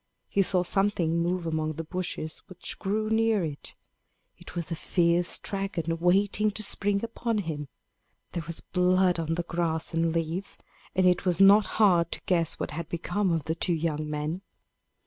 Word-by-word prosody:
He 200 - +2
saw 185 -1 +2
something 180 -4 +1
move 175 +1 -1
among 155 -1 -1
the 165 +2 -5
bushes 160 -2 -4
which 185 -2 -8
grew 210 +2 -1
near 220 -3 +2
it. 145 -2 -7 0.6
It - - -13
was 170 0 -3
a - - 0
fierce 170 +1 +2
dragon, 180 -5 -3
waiting 200 +4 +3
to 215 +1 -1
spring 200 0 +1
upon 230 0 -2
him. 155 -7 -3 0.6
There 170 - -3
was 165 - -3
blood 180 -1 +2
on 165 0 -1
the 175 - -2
grass 165 -2 -2
and 165 0 +1
leaves, 165 +3 -2 0.4
and 185 0 +3
it 180 -1 +3
was 180 -2 +1
not 200 +1 +7
hard 175 -6 +4
to - - -6
guess 170 -5 +1
what - - -4
had 165 +2 -5
become 175 +3 -1
of 165 -2 0
the 160 - -1
two 170 +1 0
young 155 -2 -2
men. 150 +4 -3
175 Hz, 175 wpm, -27 LUFS, 165-195 Hz, 0.6 s, not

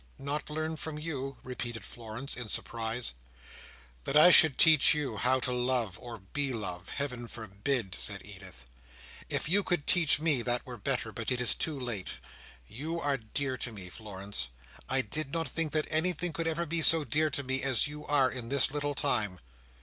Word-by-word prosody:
"Not 145 +3 -4
learn 155 +1 -3
from 155 0 -5
you?" 135 -4 -5
repeated 120 -2 -5
Florence, 120 +3 -3
in 120 -2 -6
surprise. 115 - -2 0.9
"That 150 - +1
I 175 +4 +8
should 160 -5 +7
teach 160 +1 +7
you 135 -7 -3
how 130 +5 +2
to 125 - -1
love, 125 -6 0
or 120 -2 -8
be 135 +8 -2
loved, 90 -6 -5
Heaven 125 -4 -4
forbid!" 110 -1 -3
said 100 -2 -2
Edith. 95 -11 -12 0.6
"If - - -1
you 195 +6 +3
could 175 -6 -1
teach 165 -5 +4
me, 150 -5 +3
that 120 +1 -1
were 125 -1 -8
better; 120 0 -2
but 115 +1 -4
it 125 - 0
is 125 - +6
too 155 -4 -3
late. 120 -7 -4 0.5
You 155 - -5
are 145 -3 0
dear 130 +3 -4
to 120 - -4
me, 95 -4 -9
Florence. 100 - -5 0.4
I 135 0 +3
did 155 -1 -4
not 165 +1 -1
think 165 -2 -1
that 155 -1 +1
anything 170 +1 +1
could 165 +2 -3
ever 165 +1 -1
be 165 +1 +1
so 165 -1 +7
dear 150 +5 +2
to 140 -1 -2
me, 130 0 0
as 130 -3 +3
you 150 0 -7
are 140 -3 +3
in 120 -3 -5
this 135 -1 +3
little 145 0 -1
time." 110 -11 0
130 Hz, 190 wpm, -30 LUFS, 115-150 Hz, 0.9 s, I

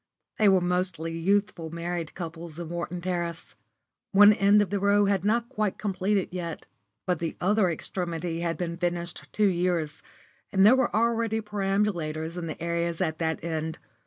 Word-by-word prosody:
They 210 -2 +6
were 190 -1 +4
mostly 175 -2 -1
youthful 185 -1 0
married 170 0 -4
couples 165 -2 -7
in 170 -2 -6
Wharton 175 +1 -4
Terrace. 175 -2 -3 0.6
One 205 +2 +8
end 205 +1 +5
of 205 -3 +1
the 200 - 0
row 200 +1 +4
was 195 -2 +1
not 230 +3 +1
quite 215 -6 -2
completed 195 -1 0
yet, 170 -3 -5 0.4
but 180 -3 0
the 165 -1 -3
other 200 0 +3
extremity 170 0 -3
had 170 -1 -1
been 170 -1 -3
finished 175 -1 -3
two 210 - +2
years, 175 -4 0 0.5
and 190 0 +5
there 230 +5 +8
were 265 -2 +2
already 230 0 +1
perambulators 195 -6 -1
in 175 -2 -4
the 155 - -6
areas 170 0 -1
at 160 -4 -1
that 160 -2 -1
end. 160 -1 -3
180 Hz, 165 wpm, -27 LUFS, 170-200 Hz, 0.6 s, One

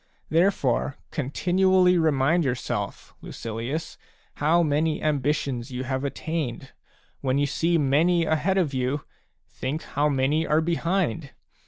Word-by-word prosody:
Therefore 155 -6 +1
continually 180 +5 +2
remind 160 0 +2
yourself, 130 -3 -3
Lucilius, 115 +8 -5 0.4
how 165 +4 +3
many 155 +1 +1
ambitions 140 -4 -1
you 130 0 -4
have 130 +1 -2
attained. 140 -3 -4 0.5
When 130 0 0
you 145 - +2
see 165 +4 +1
many 165 +4 +3
ahead 160 +5 +1
of 165 -7 +1
you, 130 +3 -1 0.4
think 145 +5 -4
how 145 +2 0
many 145 +4 +1
are 155 - +3
behind 170 -2 -1
150 Hz, 120 wpm, -25 LUFS, 135-170 Hz, 0.5 s, how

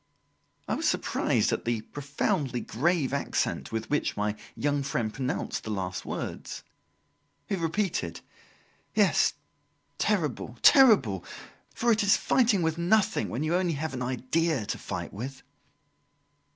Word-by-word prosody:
I - - 0
was - - +1
surprised - - +1
at - - -2
the 115 -2 -1
profoundly 145 - -2
grave 145 +3 0
accent 140 - -1
with 115 0 -3
which 150 - 0
my 105 0 0 0.2
young 145 -1 0
friend 120 -5 -2
pronounced 130 -1 -3
the - - -6
last 95 -3 -3
words. - - -5 0.8
He 200 - -1
repeated: 165 - -2 0.7
"Yes - - +3 0.6
terrible! 150 - -1
terrible! 195 - +6 0.5
For 235 0 +2
it 220 0 +3
is 200 -1 +4
fighting 225 -8 +2
with 160 +1 0
nothing, 180 - +2
when 125 +6 -2
you 155 - -1
have 175 - +3
only 175 -4 0
an 140 -4 -3
idea 130 +2 0
to - - -3
fight - - -5
with." 130 +6 -7
145 Hz, 135 wpm, -28 LUFS, 120-175 Hz, 0.8 s, terrible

